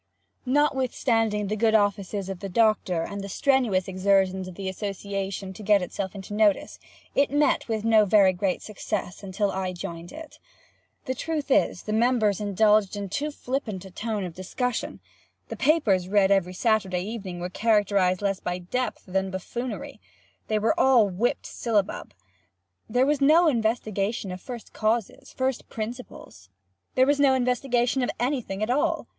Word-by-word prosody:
Notwithstanding 245 -6 +1
the 210 +2 -2
good 220 +1 +2
offices 205 -1 0
of 195 -2 -5
the 195 - -6
Doctor, 200 -5 +2
and 200 +3 -5
the 200 - -6
strenuous 240 -7 +1
exertions 190 0 +1
of 185 - -9
the 195 0 -5
association 195 0 -4
to 200 - -11
get 205 -2 +3
itself 190 +2 -5
into 195 +1 -8
notice, 210 -2 +1 0.3
it 280 - +3
met 290 +1 +2
with 220 -2 -2
no 220 -2 +5
very 195 -2 +5
great 185 0 -1
success 200 -3 -4
until 200 +1 -1
I 185 -1 -3
joined 170 -1 -7
it. 320 0 -11 0.7
The 260 - -1
truth 300 +1 -3
is, 180 - +2
the 215 - -3
members 220 -3 +2
indulged 210 0 +3
in 200 -1 -5
too 290 +10 -2
flippant 245 -9 -4
a 190 - -11
tone 215 +1 -3
of 180 -2 -5
discussion. 230 +7 -3 0.5
The - - -4
papers 250 - +2
read 200 0 +3
every 185 -2 +2
Saturday 195 -5 +1
evening 195 -4 -6
were 175 +1 -4
characterized 200 -4 +2
less 195 -1 0
by 180 0 -3
depth 245 +8 -3
than 190 +1 -1
buffoonery. 240 +8 -6 0.5
They 215 - +1
were 220 +1 +2
all 245 -6 +5
whipped 205 +7 -1
syllabub. 210 - -2 0.7
There 245 +3 +3
was 290 0 +1
no 320 +5 +6
investigation 220 -5 -1
of 180 0 -7
first 245 -3 -9
causes, 225 +4 -1
first 260 -1 -2
principles. 220 - -8 0.5
There 260 - +5
was 285 +1 +2
no 275 -2 +5
investigation 250 0 +1
of 245 - 0
any 255 +2 0
thing 195 -1 -5
at 220 - 0
all. 280 +3 0
210 Hz, 160 wpm, -26 LUFS, 190-245 Hz, 0.7 s, no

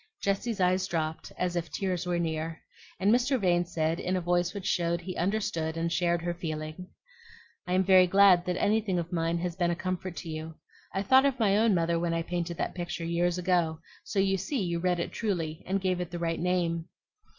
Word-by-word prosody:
Jessie's 200 +2 -1
eyes 185 0 +2
dropped, 160 -3 -3
as 180 -1 -1
if 170 -1 -2
tears 185 0 -2
were 175 -1 0
near; 160 -1 -2 0.4
and 200 +3 +4
Mr. 255 +2 +2
Vane 175 -3 +2
said, 165 -1 -1
in 185 +1 -1
a - - +1
voice 175 0 +1
which 200 -1 -7
showed 170 -1 +1
he 185 +1 -6
understood 170 -4 -1
and 165 0 -1
shared 170 -2 +1
her 175 0 -1
feeling, 155 +1 -5 0.8
"I 180 - -1
am 185 +1 +3
very 185 -1 +6
glad 190 -2 +6
that 180 0 -1
anything 210 -2 +1
of 170 0 -3
mine 165 0 0
has 175 0 -3
been 175 -2 +1
a 170 - 0
comfort 185 0 -4
to - - -7
you. 160 0 -6 0.4
I 195 - -1
thought 265 +6 +6
of 270 -2 -1
my 200 -3 +3
own 220 -1 +4
mother 170 0 +1
when 170 0 0
I 165 - -1
painted 170 0 -3
that - - -2
picture 175 -1 -4
years 170 +1 +1
ago; 175 -3 +1 0.2
so - - -6
you 195 0 +3
see 220 +9 -2
you 170 -1 -1
read 180 0 +1
it 170 - -2
truly, 170 -8 -2
and 195 +2 +1
gave 185 -2 0
it 175 - -4
the 175 - -5
right 165 -1 -1
name. 170 -2 0
175 Hz, 215 wpm, -29 LUFS, 170-190 Hz, 0.8 s, very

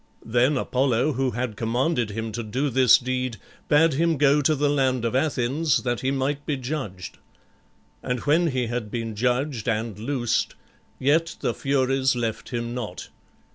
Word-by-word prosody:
Then 125 +5 +2
Apollo, 130 +2 +1
who 135 +1 0
had 120 -2 -3
commanded 120 +3 0
him 110 +2 -4
to 120 +3 -4
do 130 +6 -2
this 130 -1 +6
deed, 125 -2 -3 0.3
bade 155 +1 +4
him 165 +2 +1
go 145 +1 +4
to 155 +2 +2
the 145 +1 +1
land 130 -4 +1
of 115 - -1
Athens 140 +2 +1
that 120 -2 -1
he 130 - -1
might 140 +2 -1
be 150 -3 0
judged. 120 - -5 0.8
And 125 0 -2
when 165 +4 +3
he 130 -5 0
had 115 -2 -3
been 115 -1 -4
judged 125 +1 0
and 110 -2 -2
loosed, 120 0 -1 0.4
yet 160 +5 +1
the - - 0
Furies 135 -1 +1
left 115 -2 -3
him 120 -1 -3
not. 105 -10 -6
130 Hz, 165 wpm, -24 LUFS, 115-140 Hz, 0.8 s, this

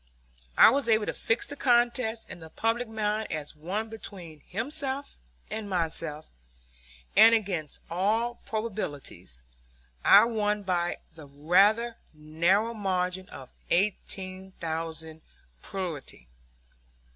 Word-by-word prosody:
I - - +9
was 275 -1 +1
able 220 -1 +4
to - - -2
fix 225 - 0
the 285 - -6
contest 240 -3 +2
in - - -9
the 160 -1 -11
public 225 +7 -1
mind 215 0 -2
as 155 -1 -5
one 190 +8 -3
between 185 -8 -9
himself 275 +6 -2 0.3
and 215 -2 -4
myself; 165 -3 -2 0.9
and, 230 +1 +8
against 185 -9 -2
all 220 +7 0
probabilities, 145 - -5 0.6
I 205 +3 +8
won 210 -3 0
by 175 -2 0 0.2
the 155 -3 -12
rather 195 +11 +3 0.2
narrow 170 +9 +1
margin 185 -2 -2
of 130 -2 -11 0.2
eighteen 190 0 -1
thousand 160 -1 -4 0.4
plurality. 165 - -6
195 Hz, 110 wpm, -28 LUFS, 165-225 Hz, 0.9 s, I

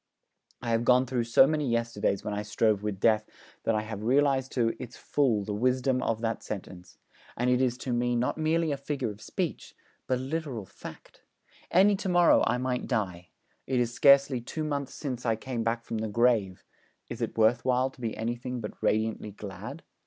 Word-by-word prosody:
I 115 - -1
have 115 0 +2
gone 125 +1 +4
through 125 -2 -1
so 115 +3 +6
many 150 -2 0
yesterdays 115 -4 0
when 105 - -3
I 105 - -2
strove 105 0 +1
with 105 -2 -3
Death 110 0 +2 0.4
that 115 - +2
I 110 - 0
have 110 -1 -6
realised 135 +2 +2
to 115 -3 +1
its 125 +1 -8
full 120 -8 +1
the 105 - -4
wisdom 130 +3 +1
of 115 -2 -1
that 115 -1 -2
sentence; 90 -3 -8 0.4
and 125 +1 +1
it 125 +1 +3
is 125 -2 +1
to 125 -1 -3
me 120 0 +1
not 120 +1 0
merely 160 0 +1
a 140 - -1
figure 140 -4 -3
of 105 +1 -13
speech, - - -4 0.3
but 130 - +1
a - - -5
literal 135 -7 -4
fact. - - -12 0.5
Any 200 +3 +5
to 190 - -3
morrow 175 -1 +5
I 120 - +1
might 125 0 -2
die. 90 -8 -2 0.4
It 130 -1 +1
is 120 -1 0
scarcely 140 -1 +5
two 155 +6 -5
months 140 -3 -3
since 130 -4 -4
I 115 -2 +1
came 120 +1 -4
back 115 +1 -1
from 115 - -3
the 110 - -2
grave: 110 -4 +1 0.4
is - - -7
it - - -3
worth 110 +2 +3
while 130 +1 +1
to 130 - -17
be 115 -2 -3
anything 120 +2 -3
but 105 -2 -8
radiantly 110 0 0
glad? 105 - -8
120 Hz, 200 wpm, -28 LUFS, 110-130 Hz, 0.5 s, so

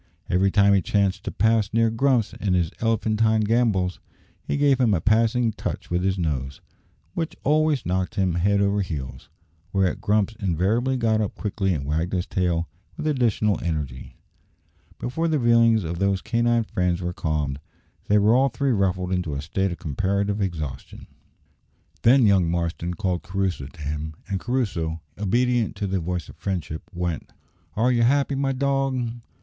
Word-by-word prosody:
Every 95 +2 +3
time 100 0 +4
he 100 - +4
chanced 100 +1 0
to - - -2
pass 110 0 +2
near 115 0 +2
Grumps 120 -1 +1
in 95 -3 -1
his 85 -3 +1
elephantine 110 -1 +2
gambols, 105 -5 +1 0.4
he - - -2
gave 140 -2 +3
him 115 -6 +3
a - - +1
passing 115 +4 +2
touch - - -5
with 90 0 +1
his 95 +1 0
nose, 70 -6 -2 0.5
which 165 -2 -3
always 155 -1 +2
knocked 90 +1 -1
him 95 -4 +1
head 100 +4 +2
over 100 0 +2
heels; 70 -9 -6 0.4
whereat 95 -2 0
Grumps 105 +1 +1
invariably 105 +8 +1
got 110 -2 +2
up 105 - -3
quickly 100 -2 -1
and 75 -6 -2
wagged 80 +5 -1
his 90 -1 0
tail 85 -2 0 0.3
with - - -5
additional 115 -8 +1
energy. 75 -7 -4 0.8
Before 160 +7 -2
the 155 -2 +1
feelings 115 -2 +4
of 85 +1 -4
those 100 -1 +1
canine 120 0 +2
friends 90 -4 -1
were 90 -1 -3
calmed, 75 -4 -2 0.5
they 105 - +4
were 105 +2 +4
all 135 +2 +4
three 135 +3 0
ruffled 95 -4 0
into 90 -5 -1
a 70 - -3
state 95 +4 -1
of 85 - -5
comparative 100 +6 -1
exhaustion. 75 -9 -5 1.0
Then 125 +1 +5
young 95 -5 +4
Marston 85 +1 -2
called 90 -5 -1
Crusoe 95 -6 -2
to 80 +2 -14
him, 75 +2 -4
and 95 -1 -2
Crusoe, 90 -11 -2 0.2
obedient 120 +3 +1
to 100 - -3
the 95 -1 -1
voice 90 +1 -3
of - - -13
friendship, 85 -5 -4
went. 85 -2 -4 0.4
"Are 120 +4 +2
you 120 -1 +2
happy, 140 +4 +3
my 135 0 0
dog?" 135 -3 -1
100 Hz, 165 wpm, -24 LUFS, 90-115 Hz, 1.0 s, Then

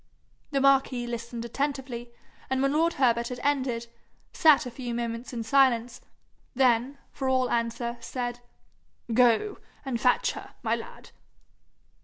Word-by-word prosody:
The 280 - 0
marquis 270 -2 +3
listened 235 0 -5
attentively, 255 -2 -3 0.4
and 265 0 0
when 275 +1 +2
lord 330 +2 +2
Herbert 235 -3 +2
had 250 0 -6
ended, 260 -5 0 0.5
sat 305 -5 +5
a 250 - -6
few 240 -1 -5
moments 235 0 -4
in 235 -2 -4
silence; 245 -1 +2 0.5
then, 255 +1 +2
for 265 -1 -2
all 255 -1 +2
answer, 235 +1 -1
said, 245 0 -4 0.7
'Go 250 - +3 0.3
and 245 -4 -2
fetch 250 - +3
her, - - -10
my - - +1
lad.' - - -10
245 Hz, 135 wpm, -27 LUFS, 235-270 Hz, 0.7 s, sat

